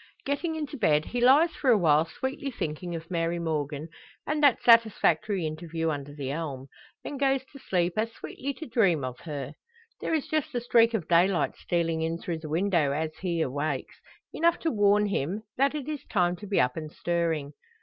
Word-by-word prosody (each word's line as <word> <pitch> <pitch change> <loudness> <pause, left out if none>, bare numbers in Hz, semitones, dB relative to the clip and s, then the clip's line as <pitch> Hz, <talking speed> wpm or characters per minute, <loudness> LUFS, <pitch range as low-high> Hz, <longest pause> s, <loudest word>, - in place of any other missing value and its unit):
Getting 305 +4 -1
into 300 -2 -4
bed, 155 - +2
he 245 - -3
lies 285 +7 +6
for 275 - -1
a 235 - +6
while 155 -4 +4
sweetly 265 +10 -4
thinking 170 - -4
of 165 +2 -8
Mary 170 0 0
Morgan, 155 -2 -2 0.4
and 300 +1 -1
that 285 -5 +4
satisfactory 210 -5 +4
interview 160 +1 -2
under 145 -1 -5
the 140 -2 -5
elm; 140 -4 -5 0.3
then 285 - -5
goes 270 -1 +2
to 275 - -11
sleep 175 -6 0
as 225 +1 0
sweetly 275 +4 -6
to 320 - -7
dream 195 - +2
of 130 -1 -5
her. 145 -3 -6 0.5
There 325 - 0
is 305 - -2
just 310 -5 -1
a - - +2
streak 235 -1 +4
of 190 -8 -3
daylight 175 +2 +3
stealing 165 -2 -1
in 165 +1 -1
through 170 -1 -4
the 155 -1 -8
window 170 -3 +2
as 155 +1 -2
he 170 -3 -2
awakes; 145 +3 -3 0.3
enough 335 +1 +2
to 325 - 0
warn 205 -1 +3
him 195 +1 -2
that 275 +3 +2
it 290 -2 -4
is 300 -3 -4
time 180 -3 +1
to 205 - -9
be 200 - +1
up 125 0 +2
and 155 -2 -6
stirring. 165 -5 -1
175 Hz, 195 wpm, -27 LUFS, 155-245 Hz, 0.5 s, lies